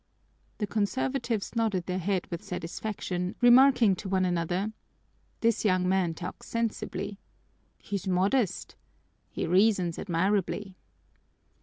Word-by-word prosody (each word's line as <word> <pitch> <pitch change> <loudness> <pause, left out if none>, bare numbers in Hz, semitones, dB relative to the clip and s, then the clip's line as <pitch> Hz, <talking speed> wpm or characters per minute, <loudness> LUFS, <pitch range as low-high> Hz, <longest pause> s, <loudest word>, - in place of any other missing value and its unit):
The 210 - -1
conservatives 235 +1 -1
nodded 215 -6 0
their 185 0 -2
heads 185 0 -1
with 170 - -4
satisfaction, 180 0 -4
remarking 245 -4 +6
to 195 - -6
one 190 -1 +2
another: 180 +4 -1 0.7
"This 230 -1 +2
young 185 -3 +2
man 185 -3 +1
talks 180 +2 -7
sensibly." 210 -3 -3 0.6
"He's 200 -2 -5
modest." 190 +4 +1 0.5
"He - - -3
reasons 185 -1 +2
admirably." 195 +2 -1
195 Hz, 110 wpm, -28 LUFS, 180-220 Hz, 0.7 s, remarking